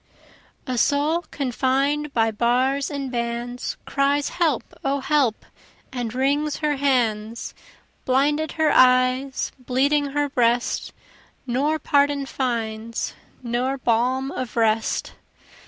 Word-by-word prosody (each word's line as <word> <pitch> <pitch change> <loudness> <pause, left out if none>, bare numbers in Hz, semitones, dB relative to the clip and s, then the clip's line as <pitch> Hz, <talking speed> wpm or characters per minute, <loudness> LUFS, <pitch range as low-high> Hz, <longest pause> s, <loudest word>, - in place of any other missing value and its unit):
A 250 -2 -1
soul 300 +7 +1
confined 275 +2 0
by 225 -3 +2
bars 255 +5 +1
and 275 -3 -4
bands, 240 0 -3
Cries, 280 +1 +1
help! 320 -8 -1
O 275 +1 0
help! 270 -5 +1 0.5
and 245 -3 -3
wrings 280 +4 0
her 300 -2 0
hands, 230 -5 0 0.5
Blinded 295 +4 +1
her 315 -2 +2
eyes, 255 +1 +3
bleeding 275 +4 +1
her 290 +1 0
breast, 245 -2 0 0.5
Nor 275 +5 0
pardon 285 -2 +2
finds, 230 -4 -3 0.3
nor 250 +3 -1
balm 255 +3 +1
of 255 -3 -5
rest. 225 -1 +1
265 Hz, 105 wpm, -23 LUFS, 240-285 Hz, 0.5 s, eyes